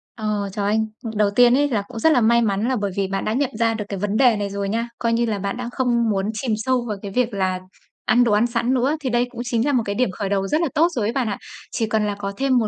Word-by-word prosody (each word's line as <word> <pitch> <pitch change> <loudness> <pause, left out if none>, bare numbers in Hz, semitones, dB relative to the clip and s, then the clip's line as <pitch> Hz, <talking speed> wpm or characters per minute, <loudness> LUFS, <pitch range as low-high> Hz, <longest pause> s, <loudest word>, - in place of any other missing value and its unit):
Ờ, 210 -3 -2
trời 200 -1 -2
ơi. 210 +2 +2 0.4
Đầu 210 -1 +3
tiên 245 +1 +6
ấy 290 0 +2
là 215 -5 0
cũng 230 -2 -7
rất 320 - +4
là 245 - +3
may 235 +2 +4
mắn 210 +1 0
là 260 - +1
bởi 205 -3 -2
vì 195 -1 +1
bạn 195 0 -3
đã 215 - 0
nhận 275 +1 +1
ra 230 -1 +3
được 210 -2 -4
cái 200 -2 -4
vấn 205 +1 -1
đề 245 -4 +5
này 205 -1 -2
rồi 200 0 -3
nha. 230 +2 -1
Coi 230 -1 +1
như 235 +1 +2
là 210 -3 -2
bạn 200 +4 -3
đã 245 -1 -4
không 240 -3 +1
muốn 195 -1 0
chìm 220 +1 -2
sâu 245 +2 0
vào 210 -2 -3
cái 200 -2 -6
việc 245 0 0
là 185 -2 0 0.5
ăn 245 0 +4
đồ 230 - +2
ăn 220 +3 +3
sẵn 235 +2 0
nữa, 265 +5 +1
thì 260 - -2
đây 240 +1 +2
cũng 240 - -7
chính 235 0 0
là 290 - +1
một 240 -3 +2
cái 200 0 -2
điểm 250 -6 +1
khởi 195 +1 -4
đầu 195 -1 0
rất 305 - +1
là 335 - +2
tốt 325 +3 +5
rồi 220 -4 0
ấy 230 - -1
bạn 255 -4 0
ạ, 200 - -3 0.3
chỉ 225 - -1
cần 215 -1 0
là 205 - -2
có 200 -1 -4
thêm 265 -2 +2
một 220 -3 +2
225 Hz, 315 wpm, -22 LUFS, 205-245 Hz, 0.5 s, tiên